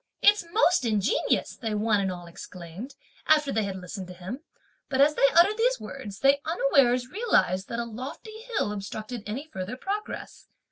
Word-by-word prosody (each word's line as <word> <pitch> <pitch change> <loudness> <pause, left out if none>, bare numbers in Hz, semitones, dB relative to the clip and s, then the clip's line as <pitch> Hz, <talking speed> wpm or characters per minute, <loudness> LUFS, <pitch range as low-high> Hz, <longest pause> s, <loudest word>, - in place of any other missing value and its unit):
"It's 415 -1 +6
most 360 - +4
ingenious!" 215 -1 +1
they 220 -3 -3
one 210 0 +2
and 190 -1 0
all 175 -1 -7
exclaimed, 175 +7 -9 0.3
after 300 -2 +4
they 220 -2 +1
had 195 -1 -4
listened 185 +1 -7
to 180 - -10
him; 185 +9 -6 0.5
but, 265 -2 -1
as 290 +2 +6
they 275 - +5
uttered 400 +6 +5
these - - +2
words, 210 -8 -8
they 275 +1 +4
unawares 275 -6 +3
realised 280 - +1
that 230 - -3
a 235 - -1
lofty 260 - -8
hill 430 - -1
obstructed 215 +3 -5
any 250 +8 -4
further 205 -4 -6
progress. 405 +8 -5
245 Hz, 175 wpm, -27 LUFS, 200-305 Hz, 0.5 s, It's